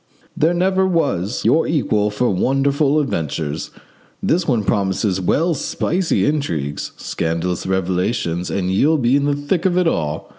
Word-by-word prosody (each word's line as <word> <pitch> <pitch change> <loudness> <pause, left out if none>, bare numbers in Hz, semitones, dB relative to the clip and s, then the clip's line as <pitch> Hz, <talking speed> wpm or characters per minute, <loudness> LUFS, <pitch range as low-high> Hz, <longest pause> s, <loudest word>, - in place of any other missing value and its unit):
There 165 +3 +2
never 190 +1 +2
was 125 - -1
your 165 - +3
equal 110 -9 +1
for 105 +3 0
wonderful 140 +8 +2
adventures. 80 - -3 0.5
This 170 +1 +1
one 120 -7 +1
promises 95 -1 0
well 165 - +1
spicy 170 +4 0
intrigues, 85 - -2
scandalous 85 +3 -2
revelations, 90 -1 -1
and 95 -1 -1
you'll 150 +12 +3
be 125 -1 +2
in 140 0 +2
the 145 0 +1
thick 145 +4 -1
of 180 -2 +1
it 180 - +3
all. 75 - -2
120 Hz, 145 wpm, -19 LUFS, -, 0.5 s, your